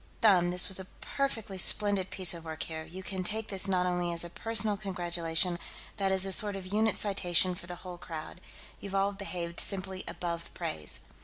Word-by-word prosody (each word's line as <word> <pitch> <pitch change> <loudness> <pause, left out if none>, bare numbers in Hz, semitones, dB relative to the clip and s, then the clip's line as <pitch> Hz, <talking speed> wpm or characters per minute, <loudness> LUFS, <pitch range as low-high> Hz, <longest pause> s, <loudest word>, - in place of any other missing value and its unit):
Them, 185 -5 +4
this 180 0 +6
was 190 -1 +1
a 190 - -7
perfectly 225 -8 -3
splendid 200 0 +6
piece 185 -3 +3
of 170 -1 -8
work 160 -1 -5
here; 160 -1 -6
you 175 +4 -10
can 190 -1 -4
take 215 +3 -2
this 195 0 +2
not 185 -2 +1
only 175 -1 -1
as 170 0 +1
a 170 - -8
personal 220 0 +2
congratulation, 175 -3 0 0.4
but 195 -2 0
as 190 0 +1
a 195 - -4
sort 205 +1 +3
of 195 -1 -7
unit 220 +1 +2
citation 185 -3 +1
for 175 -1 -11
the 175 - -6
whole 180 -1 -8
crowd. 165 +1 -8 0.4
You've 200 -1 -7
all 195 +1 +2
behaved 180 -4 -6
simply 190 -1 0
above 170 -1 -5
praise." 75 -1 -2
185 Hz, 200 wpm, -30 LUFS, 175-200 Hz, 0.4 s, this